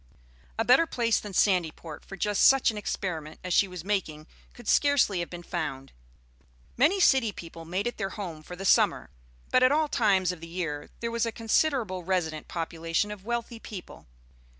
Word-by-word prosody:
A 225 - 0
better 265 +8 +5
place 230 -5 +1
than 210 - -8
Sandyport 170 -5 0
for 195 - -10
just 205 0 +1
such 270 -3 +5
an - - -9
experiment 165 -6 -4
as 180 -1 -2
she 200 - +4
was 180 -3 -8
making 175 -7 -2 0.3
could 240 - -14
scarcely 285 -10 +3
have 170 - -3
been 175 -1 -8
found. 135 -4 -4 0.8
Many 310 +11 +3
city 265 - +4
people 165 -3 -10
made 185 +5 -2
it 240 - -3
their 195 - -2
home 180 -7 -6
for 180 +3 -9
the 195 +2 -7
summer; 125 - +3 0.4
but 255 - +4
at 255 +1 +5
all 305 +1 +2
times 195 -9 +2
of 180 -3 -9
the 165 - -8
year 165 -4 -4
there 230 0 -2
was 230 0 0
a - - -2
considerable 225 - 0
resident 165 -4 -2
population 165 +3 -2
of 205 -2 -9
wealthy 235 0 -3
people. 200 - -10
195 Hz, 185 wpm, -27 LUFS, 170-230 Hz, 0.8 s, better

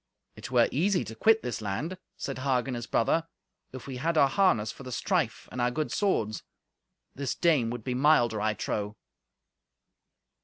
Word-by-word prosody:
"It - - -8
were - - +4
easy 180 +6 +1
to - - -7
quit 220 - +4
this 120 -2 -3
land," 125 - -3 0.2
said 135 -2 -5
Hagen, 130 -1 0
his 120 -1 -5
brother, 165 +8 +1 0.4
"if 130 -1 -9
we 130 -2 -6
had 160 +5 0
our 140 - +6
harness 135 - +2
for - - -13
the 125 - -8
strife, 115 - -1
and 125 - -3
our 120 - +3
good 150 +5 -2
swords. 110 - 0 0.7
This 140 -1 -3
dame 150 -10 +2
would 120 -1 -5
be 125 - -2
milder, 125 -5 +3
I 110 0 +1
trow." 105 0 -3
130 Hz, 170 wpm, -28 LUFS, 115-155 Hz, 0.7 s, our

